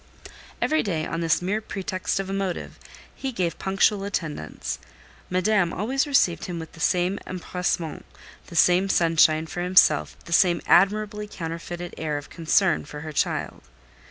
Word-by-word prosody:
Every 310 0 +2
day, 165 -6 -2
on 165 - -3
this 165 +1 +1
mere 205 +4 -1
pretext 195 -2 -3
of 195 - -3
a 195 - -4
motive, 195 -3 -3 0.3
he 270 - -4
gave 175 -8 -2
punctual 195 +1 +2
attendance; 160 - -4 0.5
Madame 185 -1 +2
always 265 +8 -1
received 180 - +2
him 175 -2 -5
with 160 -1 -7
the - - -15
same 180 +3 +1
empressement, 180 -3 -3 0.4
the 170 - -11
same 180 +3 +4
sunshine 160 -2 +4
for 175 +2 -5
himself, 180 - +4
the 170 - -5
same 175 0 +4
admirably 210 +2 +3
counterfeited 170 0 -6
air 155 -2 -2
of 145 0 -9
concern 170 +1 +2
for 150 0 -9
her 155 0 -7
child. - - -1
180 Hz, 155 wpm, -25 LUFS, 165-195 Hz, 0.5 s, same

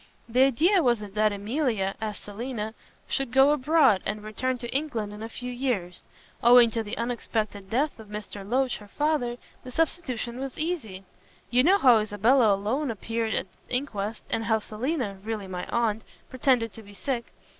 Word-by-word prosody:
"The 250 +3 +5
idea 340 - +4
was 240 -5 +3
that 210 +1 +1
Emilia, 210 -1 -1
as 215 -2 -3
Selina, 220 +1 -5 0.3
should 270 -4 -1
go 270 +2 +6
abroad 290 - +4
and 210 0 -3
return 255 +4 -2
to 240 +1 -6
England 235 -8 -2
in 210 - -9
a 225 - -5
few 250 +2 -6
years. 240 -9 -2 0.4
Owing 240 -1 +7
to 225 - -1
the 210 -2 -5
unexpected 220 -4 -3
death 275 +4 0
of 220 - -11
Mr. 210 -1 -7
Loach, 250 +5 0
the 210 - -13
father, 270 -1 0 0.3
the 255 - -8
substitution 255 -5 -1
was 270 -1 -5
easy. 290 - -3 0.5
You 245 +1 +5
know 365 +9 +5
how 250 - +6
Isabella 215 +2 +3
alone 245 +9 -1
appeared 225 0 -2
at - - -1 0.2
the - - -2
inquest, 220 -5 -3
and 225 - 0
how 220 -1 +3
Selina 220 -1 -3
really 220 -2 -3
my 180 -1 -5
aunt 225 -2 0 0.3
pretended 250 -3 +2
to 225 - -10
be 205 -1 -14
sick. 235 +4 -2
235 Hz, 175 wpm, -27 LUFS, 210-260 Hz, 0.5 s, Owing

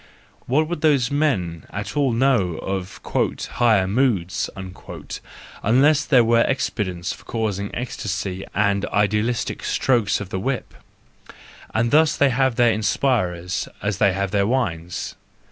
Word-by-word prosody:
What 150 +5 +2
would 170 -2 -4
those 140 -6 +3
men 95 - 0
at 105 0 -5
all 140 -3 +2
know 115 -8 +2
of 95 -1 -4
" - - -22 0.5
higher 110 -6 +3
moods," 100 -5 0 1.1
unless 140 +7 +4
there 130 -5 +5
were 115 0 +4
expedients 95 -9 -1
for - - -14
causing 105 -3 -2
ecstasy 95 -5 -4
and 100 -1 +2
idealistic 105 +3 0
strokes 115 -7 +1
of 105 -3 -6
the 95 - -3
whip!—and 115 -1 -6
thus 155 +1 +4
they 140 -1 +4
have 130 0 +1
their 120 -1 +4
inspirers 95 -5 0
as 100 -2 -1
they 100 - +4
have 100 0 -2
their 100 -1 +2
wines. 90 -9 -2
110 Hz, 130 wpm, -22 LUFS, 95-130 Hz, 1.1 s, there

